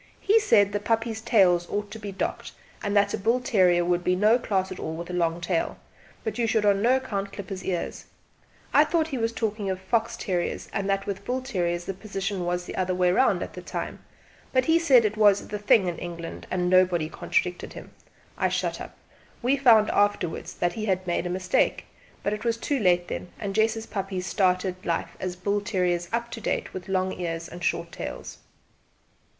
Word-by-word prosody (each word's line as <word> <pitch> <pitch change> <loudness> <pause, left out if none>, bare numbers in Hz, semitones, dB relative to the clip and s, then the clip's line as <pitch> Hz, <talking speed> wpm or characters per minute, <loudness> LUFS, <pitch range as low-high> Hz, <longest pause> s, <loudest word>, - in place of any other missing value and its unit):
He 430 +3 +4
said 215 - +4
that - - -13
the - - -18
puppies' 225 0 0
tails 185 -7 +3
ought 205 0 -3
to 220 - -7
be 205 -2 -6
docked, 190 - -4 0.3
and 205 -1 0
that 200 0 +3
a - - -1
bull 230 +5 +2
terrier 180 -7 +3
would 175 0 +1
be 180 - +2
no 215 +6 +4
class 190 -5 -1
at 185 - -6
all 160 - -4
with 170 +2 -6
a - - -6
long 170 -1 0
tail, 170 -1 -1 0.5
but 220 +1 -3
you 230 - +2
should 220 -1 +1
on 200 -1 +3
no 245 +4 +4
account 200 -7 -3
clip 200 -3 -8
his 190 -1 -5
ears. 180 -3 -3 0.7
I - - +7
thought 325 -2 0
he 270 -5 -3
was 225 0 +1
speaking 215 -3 -2
of 190 -1 -2
fox 230 +4 0
terriers, 180 -6 -2
and 200 0 -1
that 195 0 0
with 200 -1 -4
bull 255 +1 -2
terriers 175 -8 -1
the 195 - -3
position 195 -1 -4
was 175 0 -1
the - - -7
other 185 -1 0
way 180 0 +3
round, 260 +8 +3
at - - -8
that - - -10
time; - - -4 0.5
but 255 -1 +3
as - - -8
he 330 +1 +5
said 265 -9 +5
it 215 +1 -1
was 205 -2 +4
'the 210 - -4
thing' 205 -1 +4
in 175 -2 -3
England, 170 -1 -7
and 180 -1 0
nobody 180 -3 +3
contradicted 180 +2 -2
him, - - -10 0.5
I - - +2
shut - - -2
up. - - -9 0.5
We 255 +3 +3
found 230 -6 +5
out 205 0 +3
after¬wards 165 - -5
that 175 0 0
he 215 +2 -4
had 185 -2 0
made 175 0 -1
a - - -4
mistake; 185 +1 +1 0.4
but 200 - 0
it 210 - -5
was 230 -1 0
too 275 +4 -1
late 175 -4 +3
then, 180 - -5
and 200 -1 -3
Jess's 220 +1 +1
puppies 195 -2 -4
started 185 0 0
life 170 - -2
as 185 -1 -3
bull 200 +3 -1
terriers 180 -4 0
up 235 +1 -2
to 225 - -6
date, - - -2
with 185 +1 -7
long 185 0 0
ears 165 -1 -3
and 175 0 -10
short 170 0 -1
tails. - - -7
195 Hz, 220 wpm, -26 LUFS, 180-220 Hz, 0.7 s, I